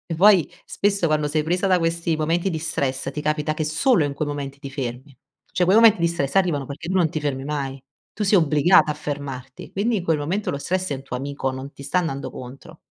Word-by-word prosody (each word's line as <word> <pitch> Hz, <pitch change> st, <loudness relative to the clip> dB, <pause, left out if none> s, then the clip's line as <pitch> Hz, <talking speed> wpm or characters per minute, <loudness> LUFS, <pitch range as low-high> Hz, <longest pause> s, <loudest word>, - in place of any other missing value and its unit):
vuoi 190 Hz, -2 st, +5 dB
spesso 200 Hz, -3 st, 0 dB
quando 155 Hz, -1 st, +1 dB
sei 150 Hz, +1 st, 0 dB
presa 180 Hz, +4 st, 0 dB
da 185 Hz, -1 st, +4 dB
questi 165 Hz, -1 st, 0 dB
momenti 170 Hz, +4 st, 0 dB
di 160 Hz, -, -2 dB
stress 135 Hz, -4 st, -2 dB
ti 150 Hz, -, -5 dB
capita 150 Hz, 0 st, 0 dB
che 155 Hz, -, -2 dB
solo 160 Hz, -, +2 dB
in 145 Hz, -1 st, -2 dB
quei 150 Hz, +1 st, -2 dB
momenti 140 Hz, -1 st, -5 dB
ti 140 Hz, -1 st, -9 dB
fermi, 130 Hz, 0 st, -6 dB, 0.4 s
cioè 180 Hz, -, +1 dB
quei 185 Hz, +3 st, +4 dB
momenti 225 Hz, -4 st, +7 dB
di 170 Hz, -, +3 dB
stress 145 Hz, -5 st, -2 dB
arrivano 165 Hz, -8 st, +1 dB
perché 145 Hz, +5 st, -7 dB
non 185 Hz, -3 st, +3 dB
ti 155 Hz, -, -2 dB
fermi 135 Hz, -2 st, -2 dB
mai, 140 Hz, -2 st, -3 dB, 0.3 s
tu 210 Hz, -, -3 dB
sei 195 Hz, -1 st, +5 dB
obbligata 155 Hz, +2 st, +4 dB
a 150 Hz, -, +1 dB
fermarti, 140 Hz, -4 st, -6 dB
quindi 215 Hz, +3 st, +1 dB
in 180 Hz, -, -3 dB
quel 165 Hz, -3 st, +1 dB
momento 175 Hz, +8 st, -2 dB
lo 140 Hz, -, -2 dB
stress 185 Hz, +5 st, -2 dB
è 140 Hz, -, -1 dB
un 130 Hz, -, -9 dB
tuo 125 Hz, -2 st, -5 dB
amico 140 Hz, 0 st, -3 dB
non 130 Hz, +2 st, -7 dB
ti 140 Hz, -, -12 dB
sta 180 Hz, +6 st, +1 dB
andando 140 Hz, -5 st, -3 dB
contro. 135 Hz, +6 st, -11 dB
155 Hz, 230 wpm, -23 LUFS, 140-175 Hz, 0.4 s, momenti